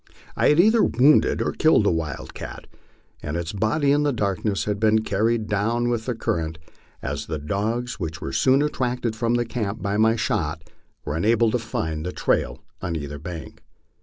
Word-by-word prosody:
I - - +3
had 150 - +4
either 220 +5 +5
wounded 135 +5 +4
or - - -1
killed 155 -8 +4
the 100 - +3
wildcat, 80 -5 -5 0.6
and 75 +3 -3
its 85 +1 -4
body 110 +8 +1
in 145 +1 +3
the 145 -1 +2
darkness 100 -3 -1
had 105 -1 -2
been 110 0 +3
carried 110 +2 +1
down 115 +4 0
with 120 -1 -2
the 125 - -1
current, 80 -7 -2 0.5
as - - -4
the 80 - -3
dogs 110 - -2
which 80 -2 -4
were - - -5
soon 135 +2 +4
attracted 125 -5 -1
from 115 +2 0
the 120 0 +1
camp 110 -3 -3
by 100 0 0
my 110 +1 +4
shot 80 -7 -1 0.4
were 75 - -2
unable 110 +6 +3
to 125 - +1
find 80 -9 -3
the 90 - -3
trail - - -1 0.2
on 90 -3 -3
either 75 -2 -5
bank. 80 +1 -8
110 Hz, 185 wpm, -23 LUFS, 85-120 Hz, 0.6 s, either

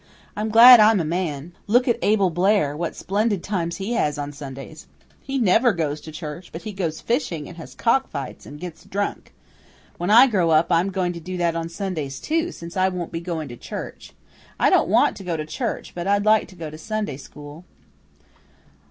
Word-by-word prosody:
I'm 215 +1 -2
glad 235 +2 +10
I'm 215 -1 +6
a 165 - -1
man. 165 -2 -3 0.2
Look 245 +5 +3
at 240 - +1
Abel 200 -3 +2
Blair, 175 -4 +2
what 170 +2 -3
splendid 205 -1 -1
times 170 -4 -2
he 200 +5 -3
has 150 -9 0
on 145 0 -4
Sundays. 140 +2 -10 0.3
He 275 0 -4
never 230 +1 +4
goes 155 -3 -2
to 160 - -10
church, 155 +2 -8
but 165 - -8
he 215 - -5
goes 170 -5 -3
fishing, 230 - -2
and 175 - -11
has 165 - -10
cock 265 +3 +1
fights, 140 -2 -7
and 145 +1 -10
gets 175 -1 -8
drunk. 205 +1 -4 0.7
When 175 +2 -2
I 230 +5 +8
grow 190 -10 +1
up, 160 +2 +3
I'm 170 +3 +3
going 185 -2 -1
to 170 - -7
do 180 +2 -6
that 170 -1 0
on 165 0 -3
Sundays 165 -7 -4
too, 330 +2 -1
since 170 - -10
I 190 0 +2
won't 180 -2 -5
be 165 - -4
going 165 -3 -4
to 120 - -9
church. - - -8 0.5
I - - +4
don't - - +3
want - - +3
to - - -9
go 175 -3 -2
to 155 - -4
church, 230 - -4
but 175 +1 -5
I'd 200 +1 +2
like 215 0 +4
to 190 - -15
go 160 -3 -7
to 155 - -10
Sunday 215 -6 -3
school." 145 +3 -12
175 Hz, 210 wpm, -23 LUFS, 155-210 Hz, 0.7 s, glad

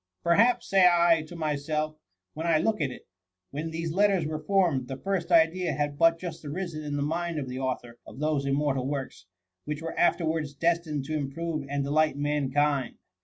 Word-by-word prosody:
^ - - -50
Per 170 - +4
haps,^ 235 +6 +4
say 190 -2 +5
I 170 -1 +4
to 175 - -10
myself, 155 0 -2 0.4
when 160 +2 -4
I 165 -2 +4
look 215 +3 0
at 140 - +1
it, 125 - -11 0.2
* 90 0 -57
when 155 +3 -4
these 165 0 -3
letters 195 -3 +3
were 155 0 -3
formed, 165 -8 +1
the 135 - -5
first 185 +1 -2
idea 165 0 +3
had 145 -1 -2
but 165 0 +5
just 165 -2 -7
arisen 155 +1 -5
in 145 -1 -3
the 145 - 0
mind 170 +2 -2
of 140 -3 -3
the 130 +1 -5
author 120 -2 -4
of - - -11
those 150 -1 0
immortal 135 -2 0
works, 135 -9 -5 0.4
which 150 0 -3
were 165 - -5
afterwards 160 -4 +1
des* 170 +3 +2
tined 150 -4 -4
to 155 - -4
improve 150 +1 -3
and 140 0 -1
delight 150 +1 +2
mankind. 145 -2 0
155 Hz, 205 wpm, -27 LUFS, 140-170 Hz, 0.4 s, say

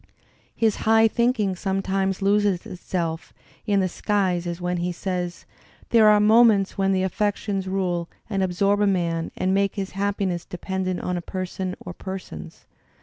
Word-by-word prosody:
His 220 -2 +1
high 225 0 +4
thinking 225 -4 +1
sometimes 195 0 -1
loses 200 -2 +2
itself 170 -2 -4 0.3
in 200 -2 +3
the 185 - +1
skies 185 -2 0
as 170 0 -4
when 180 0 -1
he 175 +1 -1
says: 180 -1 -4 0.5
"There 225 -2 +6
are 210 0 +6
moments 215 -2 +5
when 195 0 +1
the 190 -1 +1
affections 200 0 -1
rule 180 -3 -1 0.2
and 195 -3 -1
absorb 200 +3 +1
a 205 - +4
man 170 -4 0
and 185 +1 +1
make 200 0 +1
his 195 -2 -4
happiness 195 -2 -1
dependent 185 0 -3
on 180 0 -2
a - - -3
person 185 +1 -4
or 175 - -7
persons. 185 - -8
190 Hz, 155 wpm, -24 LUFS, 180-205 Hz, 0.5 s, There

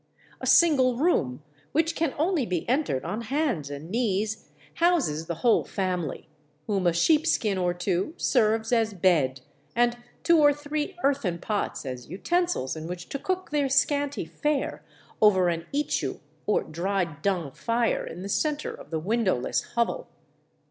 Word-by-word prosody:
A - - -4
single 265 -8 +5
room, 150 - +1 0.3
which 325 +2 +1
can 320 -4 -1
only 325 -1 +1
be 180 -7 -2
entered 255 - 0
on 205 +7 -3
hands 240 - -1
and 145 +4 -7
knees, 215 -2 -1 0.3
houses 290 - +2
the 170 - -2
whole 235 - +5
family, 180 -6 -3 0.4
whom 195 -4 0
a - - +5
sheepskin 215 - +2
or 180 -1 +1
two 185 - -1
serves 225 -2 +2
as 225 -3 +2
bed, 150 -8 +2 0.3
and 240 0 +2 0.3
two 335 -1 +5
or 290 -1 +6
three 295 +5 -4
earthen 270 -11 +1
pots 205 -3 -3
as 125 -2 -6
utensils 340 - 0
in 160 0 -6
which 175 0 -7
to 275 - -4
cook 370 +2 -3
their 290 -2 +1
scanty 285 +1 +1
fare 295 -2 -2 0.4
over 190 -4 +5
an 165 0 -3
ichu 290 +1 -1 0.3
or 210 - +2
dried 170 -2 -2
dung 180 -7 0
fire 230 - 0
in 180 - -7
the - - -4
center 300 +8 -1
of - - -12
the 160 - -2
windowless 190 - 0
hovel. 235 - 0
220 Hz, 155 wpm, -26 LUFS, 175-290 Hz, 0.4 s, or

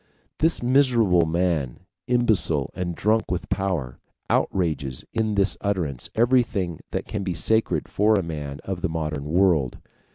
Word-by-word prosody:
This 160 -4 +2
miserable 120 - +3
man, 80 -6 -1 0.3
imbecile 95 - +2
and 85 -2 -3
drunk 110 +4 +1
with 90 - -3
power, 90 -10 -2 0.3
outrages 75 -8 0
in 110 -2 0
this 100 0 +2
utterance 90 -11 -2
everything 110 - +1
that - - -3
can 105 -2 -4
be 90 -2 -2
sacred 110 +6 +1
for 110 +2 +2
a 100 - +1
man 75 -4 -6
of 95 -2 -4
the 95 - -1
modern 75 -3 -3
world. 80 -5 +2
90 Hz, 140 wpm, -24 LUFS, 80-110 Hz, 0.3 s, miserable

